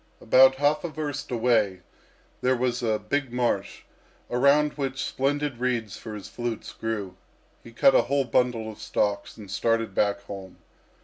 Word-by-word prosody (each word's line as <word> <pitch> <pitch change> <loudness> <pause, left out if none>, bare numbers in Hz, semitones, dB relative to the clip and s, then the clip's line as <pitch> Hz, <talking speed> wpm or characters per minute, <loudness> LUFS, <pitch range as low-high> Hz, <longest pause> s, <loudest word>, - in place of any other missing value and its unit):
About 130 +3 +6
half 145 +2 +1
a 175 - -2
verst 145 -2 -5
away 110 -6 +1 0.6
there 130 +1 +3
was 125 0 -1
a 110 -2 +1
big 130 +5 -2
marsh, 120 -1 -1 0.5
around 140 +4 +4
which 135 -2 -3
splendid 140 -1 -1
reeds 120 -5 -1
for 110 -1 -8
his 105 - -8
flutes 120 -2 -5
grew. 105 -5 -4 0.5
He 115 - -12
cut 135 +3 +5
a - - +6
whole 140 +1 0
bundle 115 -2 0
of 105 - -14
stalks 100 -1 -1
and 100 -4 -10
started 115 +1 0
back 100 +3 +1
home. 95 -2 -9
120 Hz, 160 wpm, -26 LUFS, 110-135 Hz, 0.6 s, About